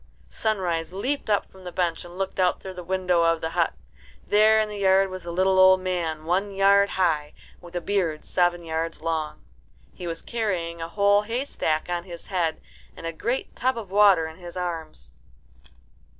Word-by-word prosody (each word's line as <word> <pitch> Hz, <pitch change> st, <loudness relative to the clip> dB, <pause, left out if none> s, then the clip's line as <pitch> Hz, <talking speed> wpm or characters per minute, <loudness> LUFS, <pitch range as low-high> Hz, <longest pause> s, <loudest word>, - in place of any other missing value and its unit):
Sunrise 175 Hz, -7 st, -1 dB
leaped 255 Hz, +7 st, -2 dB
up 205 Hz, -, +2 dB
from 190 Hz, 0 st, -15 dB
the 180 Hz, -, -7 dB
bench 170 Hz, -2 st, -1 dB
and 175 Hz, +1 st, -11 dB
looked 195 Hz, 0 st, -3 dB
out 180 Hz, -1 st, +2 dB
through 190 Hz, -, -8 dB
the 180 Hz, -1 st, -8 dB
window 180 Hz, -1 st, +1 dB
of 165 Hz, 0 st, +3 dB
the 160 Hz, 0 st, -3 dB
hut. -, -, +1 dB, 0.5 s
There 215 Hz, +1 st, +5 dB
in 215 Hz, -, +1 dB
the 210 Hz, -1 st, -6 dB
yard 195 Hz, 0 st, +4 dB
was 185 Hz, 0 st, -6 dB
the 170 Hz, -, -6 dB
little 190 Hz, +2 st, +2 dB
old 185 Hz, 0 st, +7 dB
man, 170 Hz, -4 st, -2 dB
one 190 Hz, +4 st, 0 dB
yard 200 Hz, +1 st, +5 dB
high, 155 Hz, -5 st, +1 dB, 0.3 s
with 175 Hz, 0 st, -13 dB
a 175 Hz, -, -1 dB
beard 170 Hz, -5 st, -1 dB
seven 175 Hz, -1 st, +1 dB
yards 165 Hz, 0 st, -3 dB
long. 160 Hz, -2 st, -3 dB, 0.5 s
He 180 Hz, -, -7 dB
was 165 Hz, -1 st, -4 dB
carrying 180 Hz, -8 st, -2 dB
a 165 Hz, -, -4 dB
whole 200 Hz, +2 st, +3 dB
haystack 225 Hz, -, -2 dB
on 175 Hz, 0 st, -3 dB
his 170 Hz, -2 st, -9 dB
head 170 Hz, -5 st, -1 dB, 0.4 s
and -, -, -9 dB
a 165 Hz, -, -3 dB
great 240 Hz, +10 st, -3 dB
tub 255 Hz, -1 st, 0 dB
of 210 Hz, -5 st, -7 dB
water 200 Hz, -5 st, +5 dB
in 160 Hz, 0 st, -11 dB
his 175 Hz, -1 st, -9 dB
arms. 160 Hz, -, -5 dB
180 Hz, 190 wpm, -25 LUFS, 165-200 Hz, 0.5 s, old